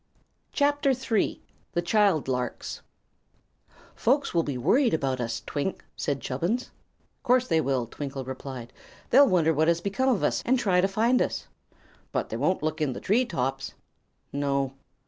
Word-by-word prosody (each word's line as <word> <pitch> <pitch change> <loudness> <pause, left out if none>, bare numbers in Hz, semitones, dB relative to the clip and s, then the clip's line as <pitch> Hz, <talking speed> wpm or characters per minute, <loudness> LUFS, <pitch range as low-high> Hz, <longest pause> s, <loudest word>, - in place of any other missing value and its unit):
[CHAPTER 285 -1 +2
III] 225 -5 0 0.3
The 175 - 0
Child 190 -5 +3
Larks 125 -1 -3 1.1
"Folks 275 +4 +1
will 170 - +3
be 145 -5 -3
worried 235 - +3
about 135 -4 -1
us, 115 -1 -3
Twink," 150 +6 -3
said 140 -2 -2
Chubbins. 170 - -2 0.5
"'Course 255 +1 +3
they 160 -2 +3
will," 135 -5 0
Twinkle 135 +2 -6
replied. 130 -2 -7 0.4
"They'll 275 +2 +7
wonder 160 -3 +3
what 155 +1 +2
has 170 0 +3
become 200 +9 0
of 240 -6 +1
us, - - +1
and 260 +2 +3
try 185 -6 +2
to 190 - +3
find 225 +6 +2
us." - - -1 0.7
"But - - -2
they - - -3
won't 185 -4 0
look 155 0 -2
in 140 -4 +1
the - - -6
tree 235 +6 +2
tops." 135 - -3 0.6
"No." 140 -1 0
165 Hz, 160 wpm, -27 LUFS, -, 1.1 s, They'll